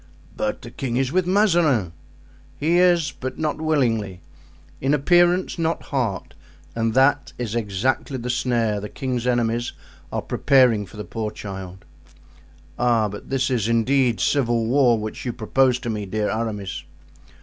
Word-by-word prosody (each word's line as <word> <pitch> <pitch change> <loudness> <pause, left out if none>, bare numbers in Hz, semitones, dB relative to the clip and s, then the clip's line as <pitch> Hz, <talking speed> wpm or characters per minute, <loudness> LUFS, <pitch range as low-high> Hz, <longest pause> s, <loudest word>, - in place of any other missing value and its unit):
"But 105 +4 -3
the 120 - -9
king 125 -2 -3
is 130 0 0
with 185 +1 +1
Mazarin." 170 - +2 0.6
"He 165 +4 +2
is, 175 -5 +3
but 130 0 -6
not 155 0 -2
willingly; 115 - 0 0.6
in 135 +3 +2
appearance, 175 +4 +3
not 165 0 -1
heart; 115 -9 -2 0.4
and 115 0 0
that 135 +1 +3
is 120 -3 -4
exactly 120 +5 -1
the 125 0 -3
snare 115 -4 0
the 105 +1 -6
king's 125 -3 -3
enemies 120 -1 0 0.4
are - - -2
preparing 125 -7 +3
for 105 - -14
the 105 - -5
poor 110 -2 -4
child." 95 -3 -8 0.9
"Ah! 115 -3 +2
but 105 +1 -9
this 130 0 0
is, 115 -4 0
indeed, 120 +1 +2
civil 120 -5 +1
war 125 -1 +4
which 110 0 -5
you 125 - -2
propose 125 +3 +2
to 120 - -4
me, 105 -2 -4
dear 105 +2 -1
Aramis." 105 -4 -3
120 Hz, 150 wpm, -22 LUFS, 110-140 Hz, 0.9 s, war